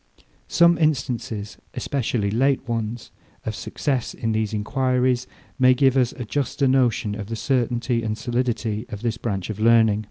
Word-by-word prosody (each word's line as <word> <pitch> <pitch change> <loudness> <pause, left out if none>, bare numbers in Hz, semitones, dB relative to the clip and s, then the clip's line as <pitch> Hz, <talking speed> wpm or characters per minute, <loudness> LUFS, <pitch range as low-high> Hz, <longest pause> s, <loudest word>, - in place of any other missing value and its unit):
Some 170 0 +4
instances, 120 -8 -1 0.2
especially 120 -7 -1
late 135 +3 +1
ones, 115 0 -3 0.3
of 110 - -2
success 130 +4 -2
in 115 - -2
these 110 -1 0
enquiries, 125 +3 0 0.3
may 130 0 +6
give 135 0 +3
us 125 -3 +3
a 125 - -6
juster 140 +3 0
notion 125 -5 +2
of 105 -1 -6
the 115 - -4
certainty 120 -1 0
and 110 -1 -2
solidity 120 -2 -2
of 105 -1 -7
this 115 -1 -1
branch 100 -4 -3
of 110 - -7
learning. 110 -2 +4
120 Hz, 155 wpm, -23 LUFS, 110-130 Hz, 0.3 s, may